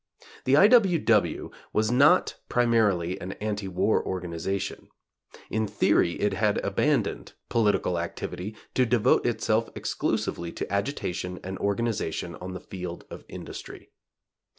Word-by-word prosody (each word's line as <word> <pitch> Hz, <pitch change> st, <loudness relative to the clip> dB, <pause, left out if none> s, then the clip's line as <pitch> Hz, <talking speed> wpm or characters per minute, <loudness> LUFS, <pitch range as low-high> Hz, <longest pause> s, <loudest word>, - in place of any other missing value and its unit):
The 135 Hz, +2 st, +5 dB
I. 195 Hz, -, +8 dB
W. 210 Hz, -7 st, +5 dB
W. 110 Hz, -8 st, +1 dB, 0.2 s
was 110 Hz, +1 st, +2 dB
not 145 Hz, +8 st, +5 dB, 0.2 s
primarily 105 Hz, -7 st, +2 dB
an 95 Hz, +2 st, -5 dB
anti 105 Hz, -2 st, -3 dB
war 95 Hz, +4 st, +1 dB
organization 95 Hz, +2 st, -4 dB, 0.6 s
In 110 Hz, 0 st, 0 dB
theory 85 Hz, -3 st, +2 dB
it 105 Hz, -1 st, 0 dB
had 105 Hz, +2 st, +1 dB
abandoned -, -, 0 dB, 0.2 s
political 100 Hz, -6 st, +2 dB
activity 90 Hz, +4 st, -5 dB, 0.2 s
to 130 Hz, -1 st, +3 dB
devote 115 Hz, -1 st, +3 dB
itself 115 Hz, -1 st, +1 dB
exclusively 85 Hz, -1 st, -2 dB
to -, -, -5 dB
agitation 95 Hz, -5 st, -2 dB
and 95 Hz, +1 st, -5 dB
organization 100 Hz, -5 st, -1 dB
on 95 Hz, +1 st, -7 dB
the -, -, -5 dB
field 90 Hz, -2 st, -7 dB
of -, -, -9 dB
industry. -, -, -9 dB
105 Hz, 130 wpm, -27 LUFS, 90-115 Hz, 0.6 s, I